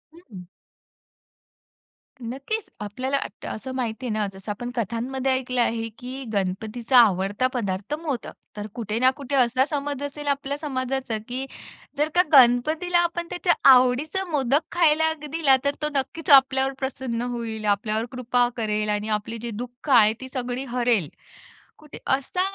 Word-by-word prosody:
हं, - - -14
हं. 185 -2 -9 1.8
नक्कीच 275 - -4 0.2
आपल्याला 255 +7 -2
अट 205 - -7
असं 260 +4 -6
माहिती 250 0 -3
आहे 235 - -2
ना 215 -1 0
जसं 190 +2 -7
आपण 240 +4 -5
कथांमध्ये 250 +4 -2
ऐकलं 255 -1 0
आहे, 225 -1 0
की 260 +2 -6
गणपतीचा 215 +6 0
आवडता 205 +1 +4
पदार्थ 205 +1 -3
मोदक. 285 -8 -4 0.2
तर 210 +1 -4
कुठे 220 -3 -3
ना 255 - +5
कुठे 280 0 -3
असा 255 0 +3
समज 285 -2 -3
असेल 290 +1 -6
आपल्या 280 0 -1
समाजाचा, 265 -5 -2
की 255 +2 -3 0.5
जर 300 +2 +1
का 355 - +7
गणपतीला 305 +8 +5
आपण 345 0 -3
त्याच्या 355 0 +2 0.2
आवडीचा 260 +9 +3
मोदक 280 +1 +2
खायला 320 -2 +3 0.2
दिला. 295 -3 +3
तर 280 0 +1
तो 300 - 0
नक्कीच 275 +5 -2
आपल्यावर 270 -1 +6
प्रसन्न 260 -3 -3
होईल, 225 -2 -4
आपल्यावर 215 +2 0
कृपा 245 -1 +1
करेल 215 -2 -1
आणि 210 +1 -1
आपली 225 +2 -7
जी 235 0 -4
दुःख 245 +4 -13
आहे 220 -5 +6
ती 260 - -6
सगळी 250 0 -3
हरेल. 235 - +2 0.7
कुठे 305 -1 -12 0.2
असा 275 +7 -1
255 Hz, 150 wpm, -24 LUFS, 225-280 Hz, 1.8 s, का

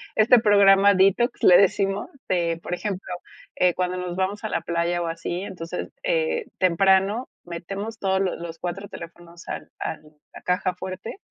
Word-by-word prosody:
este 235 +3 +6
programa 200 -1 +6
detox, 195 +6 +2
le 180 - +8
decimos 195 0 +1 0.2
de, 170 -2 0
por - - -4
ejemplo, 190 0 -4 0.4
eh, 180 -1 +2
cuando 180 0 -1
nos 180 -1 -4
vamos 190 +3 -2
a 215 - -2
la - - -1
playa 170 +1 -1
o - - -3
así, 165 +2 -4
entonces, 180 -4 -6
eh, 485 -2 0
temprano 195 +6 +2
metemos 195 +6 -6
todos 190 -1 +1
lo 190 -2 0
los 165 -1 -7
4 180 +4 -5
teléfonos 170 0 -12
al - - -6
al 160 - -4 0.3
la - - -11
caja 180 +1 0
fuerte 185 - -7
190 Hz, 165 wpm, -24 LUFS, 175-200 Hz, 0.4 s, le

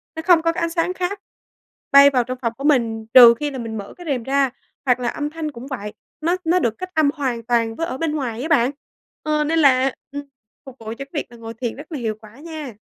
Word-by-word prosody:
nó 320 - -4
không 350 -2 +6
có 330 0 +2
cái 355 - -4
ánh 335 - 0
sáng 335 +1 -1
khác 370 +2 -3 0.7
bay 280 0 +9
vào 255 -3 +1
trong 255 +2 -5
phòng 230 -2 -1
của 275 - -8
mình 230 -7 +1
trừ 240 -2 +10
khi 295 -1 -2
là 270 - -6
mình 225 -2 -5
mở 200 -1 -8
cái 355 - -11
rèm 255 -4 -1
ra. 275 +1 +2 0.4
Hoặc 250 -1 +3
là 245 - -2
âm 295 +3 -3
thanh 310 -1 -5
cũng 255 -1 -10
vậy, 210 -7 -6 0.3
nó 340 +3 +1
nó 345 +3 +3
được 235 -9 0
cách 370 - -6
âm 310 -2 +4
hoàn 255 -6 -2
toàn 230 -1 0
với 330 - -2
ở 260 - -4
bên 325 +1 -1
ngoài 245 -6 -3
á 295 - -3
bạn, 270 -6 +3 0.5
ờ, 305 -1 +1
nên 325 +2 +1
là, 270 -2 +4 0.2
ừm, 285 0 -5 0.4
phục 265 -2 -11
vụ 225 - -13
cho 220 - -3
cái - - -34
việc 295 - -2
là 240 - -13
ngồi 225 0 -8
thiền 230 0 -4
rất 295 +5 -12
là 300 - -4
hiệu 220 -3 -2
quả 215 +4 -15
nha. 310 -5 -7
275 Hz, 265 wpm, -21 LUFS, 235-315 Hz, 0.7 s, trừ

